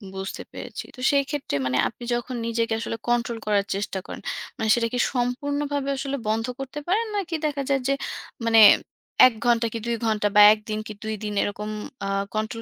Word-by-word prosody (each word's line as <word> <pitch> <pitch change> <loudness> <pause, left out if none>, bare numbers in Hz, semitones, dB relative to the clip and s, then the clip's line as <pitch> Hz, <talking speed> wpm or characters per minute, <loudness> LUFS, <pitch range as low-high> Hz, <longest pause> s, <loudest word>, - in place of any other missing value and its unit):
বুঝতে 190 0 -5
পেরেছি। - - -7
তো - - -15
সেইক্ষেত্রে 280 - 0
মানে 130 0 +1
আপনি 235 - -10
যখন 240 +1 -4
নিজেকে 230 -1 0
আসলে 225 - -4
control 240 -1 +1
করার 205 -1 +2
চেষ্টা 200 -1 -3
করেন, - - -7 0.4
মানে 220 - -1
সেটা 235 -1 +1
কি 245 - 0
সম্পূর্ণভাবে 285 +3 -1
আসলে 275 +1 -3
বন্ধ 220 +1 +1
করতে 270 +2 -5
পারেন? 420 +6 +2
নাকি 370 -5 -2
দেখা 290 -2 -1
যায় 275 -1 +2
যে 275 - +3 0.5
মানে 225 -1 +5 0.7
১ 255 - -1
ঘণ্টা 235 -1 +3
কি - - -2
২ 235 0 0
ঘণ্টা 215 -2 +1
বা 210 - +9
১ 215 - -5
দিন 215 0 -1
কি 215 - -6
২ 220 0 -2
দিন 210 -1 -3
এরকম 210 +1 -4 0.3
অ্যা - - -2 0.3
control 220 +2 -2
235 Hz, 190 wpm, -24 LUFS, 215-275 Hz, 0.7 s, বা